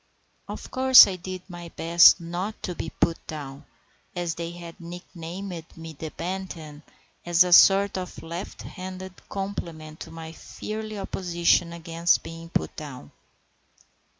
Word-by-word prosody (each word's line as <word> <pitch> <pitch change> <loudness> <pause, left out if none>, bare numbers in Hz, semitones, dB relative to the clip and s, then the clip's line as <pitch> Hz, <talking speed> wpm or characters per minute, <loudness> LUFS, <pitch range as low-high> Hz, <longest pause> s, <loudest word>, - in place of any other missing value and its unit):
Of - - -8
course 260 0 +9
I 190 - -3
did 185 0 -7
my 175 -2 -9
best 170 +2 +6
not 175 +5 -5
to 180 - -3
be 165 - -5
put 165 0 0
down, 140 -3 -7 0.5
and 175 0 -2
they 165 +1 -3
had 170 0 -10
nicknamed 175 0 -8
me 165 0 -8
"the 155 +2 -6
Bantam," 165 -4 -6 0.4
as 175 0 +5
a 180 -1 +1
sort 195 +1 +7
of 180 -2 -8
left 170 +3 -7
handed 185 -1 -8
compliment 165 -6 -5
to - - -8
my 165 -1 -8
fiery 215 +5 -6
opposition 175 -3 +1
against 170 0 +1
being 165 0 -9
put - - -2
down. 140 - -9
170 Hz, 140 wpm, -26 LUFS, 165-185 Hz, 0.5 s, course